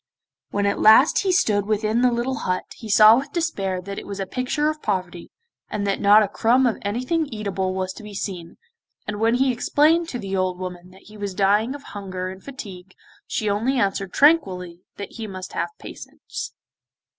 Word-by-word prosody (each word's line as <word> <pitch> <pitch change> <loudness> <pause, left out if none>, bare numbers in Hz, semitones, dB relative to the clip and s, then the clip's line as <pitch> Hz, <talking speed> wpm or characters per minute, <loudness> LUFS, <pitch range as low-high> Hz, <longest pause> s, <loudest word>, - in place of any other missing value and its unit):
When 200 0 -1
at 200 - 0
last 220 +7 +6
he 385 - +1
stood 210 - +2
within 215 +2 +1
the 250 -1 +4
little 240 +2 -1
hut 185 0 -1
he 220 - -10
saw 215 +2 +8
with 280 +1 -8
despair 200 - -1
that 200 +1 -6
it - - -11
was 200 -1 -6
a 195 - -2
picture 255 +8 -1
of 310 0 -2
poverty, 180 -3 -3 0.4
and 205 -1 -3
that 200 -1 -1
not 210 +1 +7
a - - 0
crumb 240 +6 +2
of 235 - 0
anything 255 +10 -1
eatable 195 -5 -3
was 185 0 -2
to - - -11
be 210 -1 -10
seen, 180 -4 -6 0.5
and 205 0 -4
when 225 +2 +3
he 260 0 +2
explained 315 +7 +2
to 245 - -4
the 195 -4 -4
old 185 -1 0
woman 180 -1 -7
that 190 +1 -18
he 210 0 -14
was 200 -2 -5
dying 210 +6 +2
of 285 - -10
hunger 185 -4 -6
and 190 0 -12
fatigue 195 -9 -10 0.3
she 215 - -2
only 225 +7 0
answered 195 -2 -1
tranquilly 185 - +2 0.2
that 200 -1 -7
he 225 -1 -5
must 185 -2 -8
have - - -2
patience. - - -8
205 Hz, 200 wpm, -23 LUFS, 190-250 Hz, 0.5 s, saw